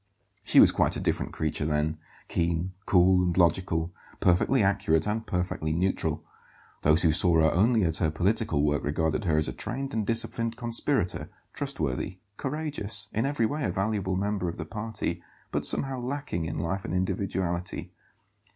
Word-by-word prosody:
She - - +4
was - - +8
quite - - +2
a - - -2
different - - -1
creature 75 -1 -2
then; 75 +1 0 0.3
keen, 85 +2 -1
cool, 90 0 +5
and 90 0 0
logical, 85 -1 +2 0.3
perfectly 100 +7 +3
accurate 95 -5 +2
and 110 +1 -2
perfectly 90 -3 -1
neutral. 90 +3 -1 0.6
Those 75 +4 +4
who 80 - +5
saw 85 +2 +5
her 80 -1 +4
only 110 +4 +3
at 80 -2 +1
her 80 - +1
political 85 -2 +1
work 75 -1 +1
regarded 80 +6 0
her 80 -3 +2
as 75 - +1
a - - -3
trained 135 +2 -4
and 110 -1 0
disciplined 115 +1 -1
conspirator, 115 - -1 0.2
trustworthy, 75 +5 -3 0.2
courageous, 135 -8 -3
in 115 +5 +1
every 140 -5 +1
way 145 +6 -2
a - - 0
valuable 95 0 -1
member 100 -2 -1
of 85 - -7
the 80 - -5
party, 105 -4 -4 0.3
but - - -1
somehow 135 -1 0
lacking 125 - -3
in 80 - -4
life 85 +5 -2
and - - -3
individuality. 90 -1 -2
95 Hz, 165 wpm, -27 LUFS, 80-110 Hz, 0.6 s, was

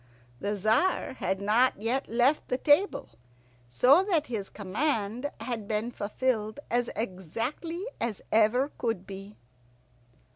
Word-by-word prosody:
The 205 +7 -1
Tzar 220 - +1
had 190 - -1
not 215 +4 +3
yet 240 +5 -1
left 250 +6 +2
the 250 - 0
table, 295 +9 +2 0.6
so 255 - +6
that 335 -7 +1
his 215 -7 -4
command 225 +3 -1
had 230 -5 -4
been 220 +2 -1
fulfilled 220 +1 -1
as 240 0 +1
exactly 230 - -4
as 230 -4 -3
ever 235 +6 +3
could 225 -6 -1
be. 195 +2 -9
230 Hz, 120 wpm, -28 LUFS, 205-265 Hz, 0.6 s, so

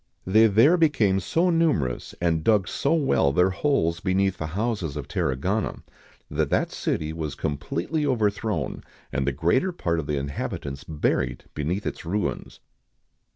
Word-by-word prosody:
They 110 +4 +5
there 115 - +5
became 115 - +3
so 165 - +1
numerous, 150 - 0
and 80 -2 +1
dug 105 -2 +3
so 145 +4 +1
well 135 - +2
their 90 +6 +3
holes 95 - +1
beneath 95 0 +1
the 80 - -3
houses 105 -9 -1
of - - -5
Tarragona, 90 +11 -1 0.4
that - - -1
that - - +1
city 80 0 -2
was 80 -3 -4
completely 85 - -2
overthrown, 105 - -1 0.3
and 70 -1 -1
the - - +3
greater 130 - +1
part 85 - -1
of 70 - -5
the 75 - -1
inhabitants 70 0 -4
buried 75 -2 -1
beneath 85 +7 -2
its - - -4
ruins. 95 +4 -3
95 Hz, 150 wpm, -25 LUFS, 80-115 Hz, 0.4 s, They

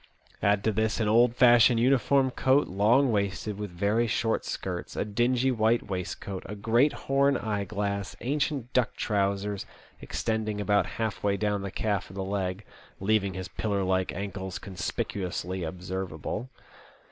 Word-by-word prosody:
Add 100 0 +2
to 110 - +2
this 110 +1 0
an 110 - +1
old 120 +2 +4
fashioned 120 -1 +6
uniform 130 +2 +3
coat, 135 +3 +3
long 115 +8 +3
waisted, 100 0 -1
with 105 -1 -4
very 100 +6 +1
short 115 +1 0
skirts, 90 -2 -4
a - - -1
dingy 120 +5 +1
white 115 -2 +1
waistcoat, 90 +1 -4
a 105 - -6
great 115 +7 +3
horn 140 0 +3
eyeglass, 100 -2 -2
ancient 140 -2 -2
duck 125 -3 +1
trousers 100 0 -1 0.3
extending 110 -2 -2
about 105 0 +2
half 110 -2 -2
way 100 -1 +2
down 105 -1 0
the 100 - -4
calf 100 0 -2
of 95 - -12
the 95 - -3
leg, 95 0 -3 0.2
" - - -27
leaving 100 -3 +2
his 95 -1 -5
pillar 100 0 -2
like 95 0 +1
ankles 95 -2 -5
con 100 - -9
spicuously 90 -1 -3
observable." 90 - -4
105 Hz, 155 wpm, -28 LUFS, 95-115 Hz, 0.3 s, fashioned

